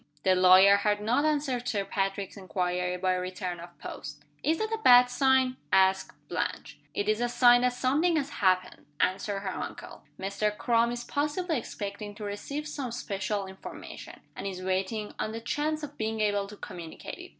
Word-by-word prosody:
The 190 Hz, -, +4 dB
lawyer 185 Hz, +2 st, +7 dB
had 205 Hz, 0 st, +1 dB
not 235 Hz, +8 st, +1 dB
answered 285 Hz, -5 st, 0 dB
Sir 205 Hz, -5 st, 0 dB
Patrick's 195 Hz, 0 st, -2 dB
inquiry 180 Hz, -2 st, -2 dB
by 185 Hz, 0 st, +1 dB
return 180 Hz, -1 st, -4 dB
of 170 Hz, 0 st, -11 dB
post. -, -, -8 dB, 0.2 s
"Is 320 Hz, +2 st, +1 dB
that 440 Hz, +3 st, -2 dB
a 445 Hz, -, -1 dB
bad 245 Hz, 0 st, +8 dB
sign?" 260 Hz, 0 st, +3 dB
asked 190 Hz, 0 st, +3 dB
Blanche. -, -, -3 dB, 0.2 s
"It 205 Hz, -, -1 dB
is 215 Hz, +2 st, +1 dB
a 240 Hz, -, +1 dB
sign 245 Hz, 0 st, +6 dB
that 250 Hz, 0 st, +2 dB
something 290 Hz, +8 st, +2 dB
has 290 Hz, -2 st, -1 dB
happened," 185 Hz, -7 st, 0 dB
answered 195 Hz, +2 st, 0 dB
her 190 Hz, -2 st, -3 dB
uncle. -, -, -7 dB, 0.2 s
"Mr. 200 Hz, +2 st, -1 dB
Crum 235 Hz, 0 st, +2 dB
is 240 Hz, 0 st, -4 dB
possibly 300 Hz, +3 st, -1 dB
expecting 205 Hz, -1 st, -6 dB
to 210 Hz, -, -8 dB
receive 280 Hz, +9 st, -4 dB
some 280 Hz, -5 st, -4 dB
special 205 Hz, -3 st, -3 dB
information, 190 Hz, 0 st, -10 dB
and -, -, -5 dB
is 185 Hz, -1 st, -5 dB
waiting 190 Hz, +3 st, -2 dB
on 215 Hz, -, -2 dB
the 225 Hz, -, -4 dB
chance 300 Hz, +6 st, -2 dB
of 290 Hz, 0 st, -8 dB
being 220 Hz, 0 st, -2 dB
able 205 Hz, -2 st, +1 dB
to 210 Hz, +1 st, -11 dB
communicate 170 Hz, -4 st, -8 dB
it. -, -, -10 dB
210 Hz, 180 wpm, -28 LUFS, 190-255 Hz, 0.2 s, bad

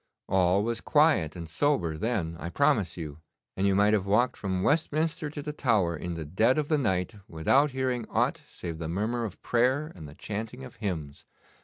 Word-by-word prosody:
All 95 Hz, +1 st, +3 dB
was 115 Hz, +1 st, -2 dB
quiet 145 Hz, -, +3 dB
and 85 Hz, -2 st, -6 dB
sober 85 Hz, -, +1 dB
then, 85 Hz, -3 st, -1 dB
I 85 Hz, -, -4 dB
promise 125 Hz, -5 st, +2 dB
you, 75 Hz, -3 st, -6 dB, 0.4 s
and 95 Hz, +1 st, +1 dB
you 100 Hz, -, +3 dB
might 105 Hz, +2 st, +4 dB
have 100 Hz, -2 st, +1 dB
walked 110 Hz, +5 st, +3 dB
from 95 Hz, -2 st, -2 dB
Westminster 155 Hz, +1 st, +1 dB
to 145 Hz, -1 st, -6 dB
the 150 Hz, -, -4 dB
Tower 110 Hz, -, +2 dB
in 85 Hz, +2 st, -5 dB
the 80 Hz, -2 st, -5 dB
dead 110 Hz, -, +2 dB
of 150 Hz, -1 st, -1 dB
the 155 Hz, -2 st, +3 dB
night 95 Hz, -3 st, 0 dB
without 130 Hz, -, +3 dB
hearing 130 Hz, -3 st, -2 dB
aught -, -, +1 dB
save 85 Hz, -2 st, -7 dB
the 80 Hz, -1 st, -4 dB
murmur 110 Hz, +7 st, -1 dB
of 105 Hz, -, -7 dB
prayer 130 Hz, +6 st, +1 dB
and 80 Hz, -5 st, -10 dB
the 70 Hz, -, -13 dB
chanting 110 Hz, +7 st, -5 dB
of 125 Hz, -, -11 dB
hymns. 80 Hz, -10 st, -5 dB
105 Hz, 195 wpm, -28 LUFS, 85-130 Hz, 0.4 s, might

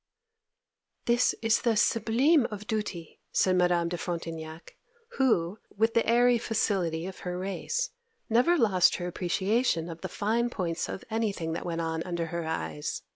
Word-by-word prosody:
'This 240 Hz, +1 st, +3 dB
is 225 Hz, 0 st, +3 dB
the 230 Hz, -3 st, +2 dB
sublime 235 Hz, +7 st, +3 dB
of 210 Hz, -1 st, -7 dB
duty!' 210 Hz, -7 st, -4 dB
said 185 Hz, -1 st, +3 dB
Madame 175 Hz, -1 st, +3 dB
de 175 Hz, +1 st, -3 dB
Frontignac, 165 Hz, -1 st, -6 dB, 0.4 s
who, 205 Hz, -7 st, +2 dB, 0.2 s
with 225 Hz, +2 st, +2 dB
the 230 Hz, -, +3 dB
airy 240 Hz, 0 st, +5 dB
facility 185 Hz, -8 st, 0 dB
of 190 Hz, 0 st, -7 dB
her 180 Hz, 0 st, -4 dB
race, 195 Hz, -, -2 dB, 0.4 s
never 250 Hz, +10 st, +4 dB
lost 195 Hz, -, +4 dB
her 175 Hz, -, -4 dB
appreciation 180 Hz, +1 st, 0 dB
of 165 Hz, 0 st, -10 dB
the -, -, -4 dB
fine 230 Hz, +3 st, 0 dB
points 170 Hz, -7 st, -3 dB
of -, -, -6 dB
anything 200 Hz, -7 st, -1 dB
that 170 Hz, -, -4 dB
went 170 Hz, -1 st, -2 dB
on 160 Hz, 0 st, -2 dB
under 170 Hz, -1 st, -2 dB
her 170 Hz, 0 st, -4 dB
eyes. 80 Hz, -, -3 dB
190 Hz, 155 wpm, -28 LUFS, 170-230 Hz, 0.4 s, airy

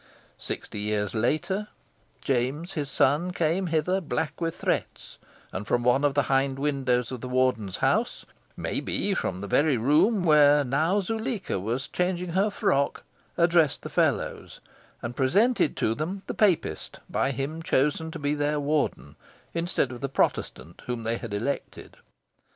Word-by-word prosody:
Sixty -, -, -6 dB
years 105 Hz, -1 st, -1 dB
later, 155 Hz, -, 0 dB, 0.5 s
James, 135 Hz, +7 st, -1 dB
his 145 Hz, -3 st, -3 dB
son, 150 Hz, +7 st, +2 dB
came 175 Hz, +3 st, 0 dB
hither, 165 Hz, +4 st, +1 dB
black 160 Hz, 0 st, -3 dB
with 165 Hz, -1 st, -1 dB
threats, -, -, -3 dB, 0.3 s
and 100 Hz, +2 st, -5 dB
from 120 Hz, 0 st, +1 dB
one 125 Hz, +3 st, +3 dB
of 145 Hz, -1 st, +2 dB
the 145 Hz, -, +3 dB
hind 135 Hz, 0 st, +1 dB
windows 135 Hz, -4 st, 0 dB
of 125 Hz, -3 st, -6 dB
the 125 Hz, -, -5 dB
Warden's 125 Hz, -6 st, +1 dB
house -, -, 0 dB, 0.3 s
maybe, -, -, -1 dB
from 90 Hz, -, -2 dB
the 100 Hz, -, -5 dB
very 145 Hz, +5 st, +3 dB
room 155 Hz, -, +3 dB
where 150 Hz, -3 st, +6 dB
now 155 Hz, +10 st, +1 dB
Zuleika 220 Hz, -, -2 dB
was 115 Hz, +7 st, -2 dB
changing 180 Hz, 0 st, -1 dB
her 190 Hz, +5 st, +2 dB
frock 190 Hz, -9 st, 0 dB, 0.3 s
addressed 170 Hz, -3 st, +3 dB
the -, -, -5 dB
Fellows, -, -, -1 dB, 0.4 s
and 120 Hz, +1 st, -4 dB
presented 190 Hz, -, +2 dB
to 110 Hz, -, +1 dB
them 180 Hz, +9 st, -4 dB
the -, -, -4 dB
Papist 200 Hz, -6 st, 0 dB
by -, -, 0 dB
him 140 Hz, +5 st, -3 dB
chosen 150 Hz, +1 st, +1 dB
to -, -, -6 dB
be 145 Hz, 0 st, -1 dB
their 150 Hz, 0 st, 0 dB
Warden, 145 Hz, -, -1 dB, 0.4 s
instead 170 Hz, -6 st, 0 dB
of 125 Hz, -, -8 dB
the 140 Hz, -, -2 dB
Protestant 85 Hz, -9 st, -1 dB
whom 120 Hz, -2 st, -3 dB
they 115 Hz, +1 st, -1 dB
had 115 Hz, -3 st, -7 dB
elected. 110 Hz, +8 st, -4 dB
145 Hz, 155 wpm, -26 LUFS, 125-170 Hz, 0.5 s, where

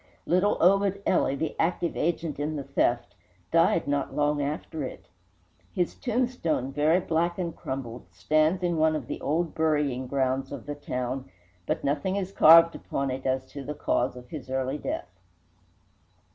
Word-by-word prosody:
Little 185 Hz, +4 st, +2 dB
Obed 195 Hz, +2 st, +3 dB
Ely, 140 Hz, -6 st, +2 dB
the 155 Hz, +2 st, -3 dB
active 170 Hz, 0 st, 0 dB
agent 165 Hz, -3 st, -1 dB
in 150 Hz, +2 st, -2 dB
the 140 Hz, -, -4 dB
theft, 120 Hz, -5 st, 0 dB, 0.4 s
died 165 Hz, -1 st, +3 dB
not 140 Hz, -1 st, -1 dB
long 145 Hz, 0 st, +1 dB
after 150 Hz, +1 st, -3 dB
it. 130 Hz, -, -7 dB, 0.7 s
His 175 Hz, -1 st, 0 dB
tombstone, 240 Hz, -, -1 dB
very 155 Hz, +5 st, +3 dB
black 170 Hz, 0 st, 0 dB
and 170 Hz, -3 st, -3 dB
crumbled, 125 Hz, -6 st, -6 dB
stands 155 Hz, -, +1 dB
in 175 Hz, -2 st, +1 dB
one 155 Hz, 0 st, +3 dB
of 155 Hz, -, -4 dB
the -, -, -6 dB
old 160 Hz, +3 st, -1 dB
burying 150 Hz, -5 st, 0 dB
grounds 135 Hz, 0 st, -1 dB
of 140 Hz, -, -7 dB
the 145 Hz, -, -4 dB
town, 130 Hz, -2 st, -4 dB, 0.4 s
but -, -, -1 dB
nothing 150 Hz, +7 st, 0 dB
is 195 Hz, -1 st, -2 dB
carved 165 Hz, -2 st, +8 dB
upon 135 Hz, -1 st, -3 dB
it 130 Hz, +1 st, -4 dB
as 130 Hz, 0 st, 0 dB
to 140 Hz, -, -7 dB
the 150 Hz, +3 st, -5 dB
cause 125 Hz, -3 st, 0 dB
of 125 Hz, 0 st, -12 dB
his 145 Hz, -6 st, -8 dB
early 130 Hz, +2 st, -1 dB
death. 320 Hz, -, -5 dB
150 Hz, 165 wpm, -27 LUFS, 135-170 Hz, 0.7 s, carved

